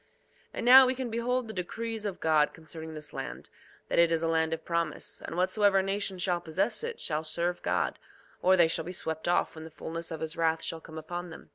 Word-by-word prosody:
2:9 - - -37 0.5
And - - -3
now, 260 +1 +10
we 260 - +1
can 255 -2 -4
behold 245 +1 0
the 220 - -6
decrees 220 +4 -3
of 195 - -5
God 155 -2 +3
concerning 160 0 -8
this 150 -2 -5
land, 65 +4 -6 0.4
that - - +1
it 170 -1 +5
is 165 0 +1
a - - +2
land 160 0 +1
of 165 - -4
promise; 170 -2 -1
and 165 - -6
whatsoever 195 +1 +3
nation 195 0 -1
shall 180 -1 0
possess 185 - -1
it 470 0 -4
shall 155 0 -1
serve 170 +3 -1
God, - - 0 0.4
or 185 +1 +5
they 170 -2 +6
shall 165 0 0
be 180 - -5
swept 160 -2 -3
off 175 - +2
when 160 - -9
the 160 - -8
fulness 165 +1 -6
of 160 - -6
his 160 0 -3
wrath 165 -1 +1
shall 165 - -4
come 160 0 -11
upon 175 +3 -5
them. 160 - -12
170 Hz, 235 wpm, -29 LUFS, 160-195 Hz, 0.5 s, now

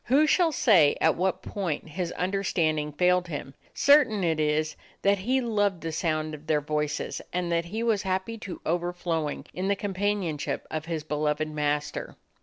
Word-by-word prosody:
Who 280 +5 +4
shall 335 +1 +3
say 180 - +5
at - - +3
what 185 +2 -1
point 175 -5 -3
his 175 +2 -3
under 195 +2 -1
standing 155 -5 0
failed 180 +3 +2
him? 145 -4 -6 0.2
Certain 260 -9 +5
it 160 -2 +1
is 155 +1 +1 0.3
that 200 0 +3
he 255 +7 +1
loved 205 -6 0
the 165 - -3
sound 155 -1 -1
of 155 +1 -10
their 155 -2 +3
voices 150 0 -2
and 175 -1 -1
that 170 0 +1
he 215 +7 -3
was 225 -4 +2
happy 190 +4 -2
to 195 -4 -7
overflowing 170 -2 -2
in 185 +2 -2
the 200 - +2
companionship 195 -5 -2
of 155 -1 -3
his 165 -2 -3
beloved 150 0 -1
master. 150 -1 -2
175 Hz, 175 wpm, -27 LUFS, 155-200 Hz, 0.3 s, say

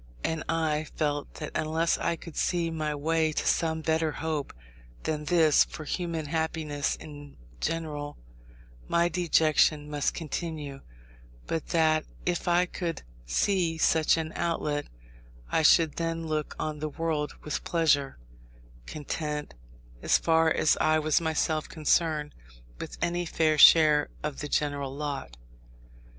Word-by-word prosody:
And 160 -1 -1
I 155 -2 0
felt 145 -2 -2
that 150 - -6
unless 160 +2 0
I 170 - 0
could 165 -1 -11
see 170 -2 0
my 155 -2 -2
way 160 +2 +1
to - - -2
some 160 -1 +1
better 160 -1 +1
hope 155 -3 -3 0.5
than 150 -1 -2
this 160 -3 +5
for 155 - -9
human 165 0 -3
happiness 155 -2 -1
in 145 -2 -11 0.2
general, 150 -3 -3 0.7
my 170 0 +2
dejection 155 -3 +2
must 145 -1 -1
continue; 155 -3 -5 0.7
but 165 -1 -3
that 155 -2 +2 0.2
if 175 0 -1
I 175 +1 +4
could 170 -1 -4 0.2
see 170 - +1
such 160 0 +3
an 160 0 -3
outlet, 150 -3 -1 0.6
I - - +3
should 160 0 +4
then 165 0 -2
look 155 -1 -3
on 155 -1 -3
the 155 +1 -3
world 155 -1 -2
with 150 - -3
pleasure; 145 -5 +1 0.7
content, 150 0 -4 0.5
as - - +4
far 160 -1 +3
as 155 - +3
I 155 0 +4
was 155 +1 +2
myself 160 -1 -1
concerned, 155 -1 +1 0.5
with - - -7
any 175 0 -1
fair 155 -2 +1
share 150 -1 +7
of 150 -2 -4
the 145 - -4
general 140 -2 -1
lot. 140 - -5
155 Hz, 135 wpm, -28 LUFS, 150-165 Hz, 0.7 s, share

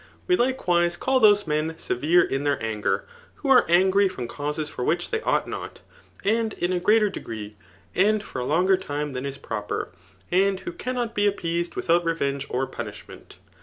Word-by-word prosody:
We, 360 - +3
likewise^ 175 - +1
call 265 0 +2
those 205 -3 +5
men 155 +1 -1
severe 165 +6 +2
in 135 +1 -2
then: 145 -1 +1
anger, 110 -2 -1 0.3
who 280 - -4
are 260 -2 +6
angry 190 +3 +4
from 125 -9 -6
causes 150 +3 -3
for 125 - -5
which 175 +6 0
they 445 - 0
ought - - +1
not, - - -7 0.4
and 220 +1 +1
in 175 +1 -1
a 180 - +1
greater 210 +2 +3
degree^ 110 - -7 0.4
and 210 - +3
for 125 - -6
a - - -3
Icmger 185 +6 +3
time 145 -2 -3
than 130 +2 -3
is 140 0 -5
[m>per, 105 -2 -4 0.4
and 190 +1 +2
who 360 - -5
cannot 250 -8 -3
be 205 -1 +2
appeased 170 -3 -2
without 170 +1 +2
revenge 140 -5 -1
or 130 +2 0
punishment. 130 - -9
175 Hz, 180 wpm, -25 LUFS, 145-205 Hz, 0.4 s, are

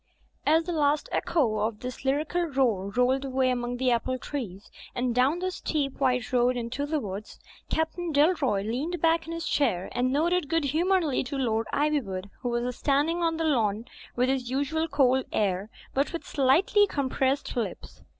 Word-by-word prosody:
'* - - -41
As 320 +2 +4
the 350 - -4
last 295 -2 +1
echo 245 -11 +1
of 215 0 -2
this 250 0 -6
lyrical 305 +6 0
roar 245 - 0
rolled 250 +5 +2
away 260 -1 +1
among 245 0 -2
the 255 0 +2
apple 250 +2 0
trees, 215 -9 -6 0.2
and 245 -1 0
down 260 +7 +3
the 370 +1 -2
steep, 290 -6 -2
white 250 -3 0
road 250 0 +3
into 245 +5 -3
the 310 0 0
woods. 205 -3 -7 0.3
Captain 325 +2 -1
Dalroy 285 - +2
leaned 300 +10 -2
back 330 0 +2
in - - -5
his 335 0 -4
chair 190 -11 +1
and 250 +1 0
nodded 330 +2 +1
good 330 -1 +1
humouredly 325 0 +1
to 275 +3 -4
Lord 225 -4 0
Ivywood, 220 -11 -1
who 245 - -3
was 240 +1 -1
standing 295 +6 +1
on 330 -1 +1
the 325 - -1
lawn 225 -8 +1 0.3
with 250 +1 +2
his 260 -2 -1
usual 285 +5 0
cold 265 -4 +2
air, 195 0 0 0.2
but 275 +2 +1
with 335 - -5
slightly 320 +10 +3
compressed 270 -2 -1
lips. 235 -3 -5
270 Hz, 180 wpm, -27 LUFS, 245-315 Hz, 0.3 s, As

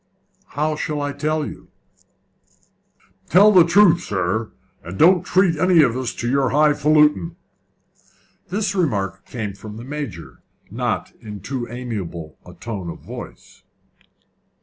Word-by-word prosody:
"How 155 +1 0
shall 150 0 -3
I 145 0 -2
tell 155 +2 -1
you?" - - -10 1.6
"Tell 205 +4 +7
the 185 -4 +7
truth, 175 0 +5
sir, 105 +3 -2 0.3
and 90 +3 -8
don't 175 +2 +5
treat 185 +1 +3
us 165 - -1
to - - -5
any 165 -3 +7
of 125 -1 -2
your 130 +2 +1
high 150 +1 +4
faluting." 150 +3 +2 1.1
This 200 +1 -1
remark 100 - -2
came 110 -5 -5
from 105 +2 -10
the 115 - -8
Major 135 - -7 0.3
not - - -2
in 105 -2 -8
too 120 +4 -5
amiable 100 -10 -6
a 90 - -14
tone 100 -3 -6
of - - -7
voice. - - -11
140 Hz, 135 wpm, -21 LUFS, 105-160 Hz, 1.6 s, Tell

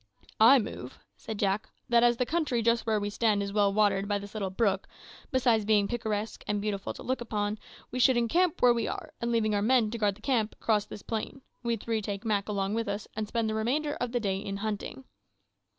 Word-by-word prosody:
"I 230 +5 +8
move," 130 - -5 0.2
said 220 - -7
Jack, 205 +2 0 0.2
"that 235 -1 +4
as 240 0 +4
the 250 - +1
country 290 -6 0
just 235 0 +2
where 215 -1 +2
we 205 0 -3
stand 210 -2 +1
is 200 0 -5
well 205 -1 +3
watered 200 -1 +2
by 205 0 +1
this 200 0 -9
little 205 -3 -2
brook, 195 -1 0 0.4
besides 240 -4 +2
being 205 -1 +3
picturesque 220 -2 -3
and 210 0 0
beautiful 200 -1 -3
to - - -9
look 260 0 -2
upon, 210 -2 -2 0.3
we 250 - -3
should 255 0 +5
encamp 325 +9 +1
where 245 -1 +7
we 235 -1 -1
are, - - -6
and 235 0 -1
leaving 220 -2 +1
our 205 - +1
men 225 -1 +3
to 235 - -4
guard 205 -2 +1
the 210 - -19
camp, 225 -4 0
cross 210 -2 +1
this 200 - -10
plain 230 +4 -4 0.2
we 235 -1 0
three 225 0 -2
take 200 +1 -5
Mak 210 -2 0
along 200 -1 -1
with 230 0 -1
us, 200 +1 -4
and 215 -1 -2
spend 230 0 -1
the 215 - -1
remainder 275 +8 0
of 245 -1 -1
the 245 - 0
day 195 -4 -1
in 195 0 -4
hunting." 215 +5 -4
220 Hz, 230 wpm, -29 LUFS, 205-235 Hz, 0.4 s, I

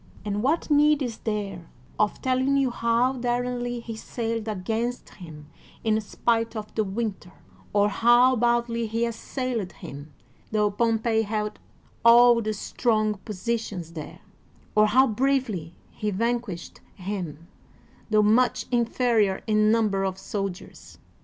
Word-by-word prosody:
And 205 0 -1
what 305 +6 0
need 295 0 +4
is 235 -3 -4
there 200 -6 -4 0.3
of 210 -1 0
telling 260 +2 +2
how 235 +2 +1
daringly 245 -1 -2
he 230 -1 -7
sailed 225 0 -4
against 220 +4 -3
him 155 -5 -12 0.3
in 220 -1 +2
spite 230 +2 -1
of 215 -1 -6
the 220 - +1
winter, 200 -3 -4 0.4
or 205 0 +3
how 240 +4 +4
boldly 235 -1 +1
he 230 +2 0
assailed 235 - -3
him, 145 +1 -10 0.4
tho 210 -1 +2
Pompey 225 +1 +1
held 210 0 -3 0.4
all 235 0 +7
the 215 -1 -2
strong 215 -1 0
positions 205 -4 -4
there, 155 -2 -8 0.5
or 215 0 +5
how 260 +5 +5
bravely 225 - -1 0.2
he 210 - -3
vanquished 230 -2 -3
him, 180 -5 -6 0.6
tho 215 -1 +4
much 245 +4 +3
inferior 235 -4 +1
in 215 -1 +3
number 210 -4 +2
of 190 -1 -2
soldiers? 195 -1 -6
225 Hz, 125 wpm, -25 LUFS, 205-240 Hz, 0.6 s, all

